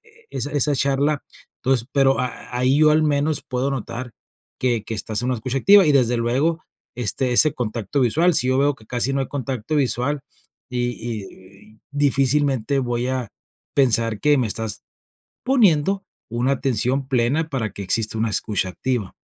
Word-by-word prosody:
e 440 Hz, +1 st, -24 dB
esa 145 Hz, -, -4 dB
esa 145 Hz, 0 st, +2 dB
charla. 140 Hz, +2 st, +1 dB, 0.4 s
Entonces 125 Hz, -3 st, +1 dB
pero 135 Hz, -1 st, +3 dB
a 125 Hz, -, +1 dB
a 125 Hz, 0 st, -7 dB
ahí 130 Hz, +3 st, +3 dB
yo 155 Hz, 0 st, +5 dB
al 155 Hz, +1 st, +3 dB
menos 150 Hz, 0 st, 0 dB
puedo 130 Hz, +2 st, -2 dB
notar 125 Hz, -1 st, -5 dB, 0.5 s
que 120 Hz, -4 st, 0 dB
que 115 Hz, -, -5 dB
estás 105 Hz, 0 st, -1 dB
en -, -, -2 dB
una 130 Hz, -, +1 dB
escucha 130 Hz, +4 st, -3 dB
activa 200 Hz, +6 st, +6 dB
y 150 Hz, -, +4 dB
desde 125 Hz, -3 st, +3 dB
luego 135 Hz, +8 st, 0 dB, 0.3 s
esté 125 Hz, +2 st, -1 dB
ese 150 Hz, +5 st, +5 dB
contacto 115 Hz, +2 st, -3 dB
visual, 160 Hz, +9 st, +3 dB
si 125 Hz, -, +3 dB
yo 130 Hz, -, +2 dB
veo 145 Hz, +1 st, +2 dB
que 110 Hz, -, -20 dB
casi 125 Hz, +3 st, -1 dB
no 135 Hz, -, 0 dB
hay 135 Hz, -, -3 dB
contacto 135 Hz, 0 st, -3 dB
visual 135 Hz, +1 st, 0 dB, 0.5 s
y 125 Hz, -1 st, -1 dB
y 115 Hz, -3 st, -5 dB, 0.5 s
y -, -, -27 dB
difícilmente 140 Hz, -2 st, +1 dB
voy 120 Hz, -1 st, -2 dB
a 130 Hz, -3 st, -2 dB, 0.5 s
pensar 115 Hz, -5 st, +2 dB
que 150 Hz, -1 st, +4 dB
me 125 Hz, -, +1 dB
estás 110 Hz, 0 st, -3 dB, 0.6 s
poniendo 195 Hz, -, +2 dB, 0.2 s
una 120 Hz, +3 st, 0 dB
atención 130 Hz, +1 st, -1 dB
plena 135 Hz, +5 st, +1 dB
para 115 Hz, -8 st, -2 dB
que 100 Hz, -, -7 dB
exista 110 Hz, +3 st, 0 dB
una 110 Hz, +1 st, 0 dB
escucha 100 Hz, -2 st, 0 dB
activa. 115 Hz, +1 st, -3 dB
130 Hz, 180 wpm, -21 LUFS, 120-145 Hz, 0.6 s, activa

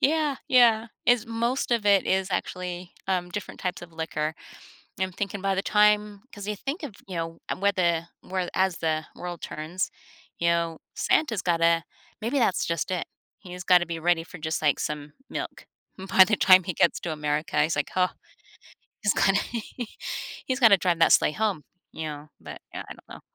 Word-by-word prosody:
Yeah, 300 Hz, -1 st, +2 dB
yeah. 235 Hz, -3 st, +5 dB, 0.2 s
Is 240 Hz, -1 st, +4 dB
most 235 Hz, +3 st, -1 dB
of 230 Hz, -3 st, +1 dB
it 200 Hz, -2 st, +5 dB
is 190 Hz, 0 st, +1 dB
actually, 180 Hz, -1 st, -4 dB, 0.2 s
um, 180 Hz, -2 st, 0 dB
different 205 Hz, -, -6 dB
types 180 Hz, -1 st, -3 dB
of 170 Hz, -1 st, -11 dB
liquor. 160 Hz, -1 st, -2 dB, 0.7 s
I'm 190 Hz, -1 st, 0 dB
thinking 200 Hz, +1 st, -4 dB
by 195 Hz, 0 st, +1 dB
the 195 Hz, -, 0 dB
time 210 Hz, -1 st, +3 dB
'cause 205 Hz, 0 st, -8 dB
you 210 Hz, -, -2 dB
think 280 Hz, -, -4 dB
of, 270 Hz, -9 st, -6 dB
you 185 Hz, -, -5 dB
know, 165 Hz, 0 st, -4 dB
uh, -, -, -1 dB
where 200 Hz, +1 st, +2 dB
the 170 Hz, -3 st, +1 dB, 0.2 s
where 185 Hz, -1 st, -3 dB
as 190 Hz, -2 st, +1 dB
the 160 Hz, -1 st, 0 dB
world 175 Hz, -1 st, -6 dB
turns, 160 Hz, +5 st, -3 dB, 0.5 s
you 170 Hz, -, +1 dB
know, 170 Hz, -1 st, +1 dB, 0.2 s
Santa's 235 Hz, -, +1 dB
gotta 165 Hz, -1 st, +3 dB, 0.4 s
maybe 240 Hz, +6 st, 0 dB
that's 225 Hz, -6 st, +2 dB
just 170 Hz, 0 st, -1 dB
it. 180 Hz, -2 st, -2 dB, 0.3 s
He's 180 Hz, -2 st, -8 dB
gotta 180 Hz, -2 st, +5 dB
be 165 Hz, -1 st, -4 dB
ready 170 Hz, -1 st, +2 dB
for 180 Hz, -, -11 dB
just, 160 Hz, +1 st, -2 dB
like, 150 Hz, -2 st, +2 dB
some 150 Hz, -1 st, -4 dB, 0.2 s
milk. -, -, -6 dB, 0.3 s
By 190 Hz, 0 st, +5 dB
the 215 Hz, +2 st, +1 dB
time 185 Hz, -2 st, +7 dB
he 180 Hz, -, -3 dB
gets 170 Hz, -, +2 dB
to 170 Hz, -, -3 dB
America, 150 Hz, 0 st, -1 dB
he's 155 Hz, +1 st, 0 dB
like, 145 Hz, -, -1 dB
"Oh," 180 Hz, 0 st, +3 dB, 0.9 s
he's 210 Hz, -, +2 dB
gonna 195 Hz, 0 st, +3 dB, 1.1 s
he's 260 Hz, +1 st, -1 dB
gotta 225 Hz, -5 st, +8 dB
drive 180 Hz, -2 st, 0 dB
that -, -, +6 dB
sleigh -, -, +5 dB
home, 210 Hz, -5 st, -1 dB, 0.3 s
you 160 Hz, -, -5 dB
know, 150 Hz, 0 st, -7 dB
but, -, -, -9 dB
yeah, -, -, -5 dB
I -, -, -6 dB
don't -, -, -20 dB
know. -, -, -10 dB
185 Hz, 190 wpm, -26 LUFS, 165-210 Hz, 1.1 s, gotta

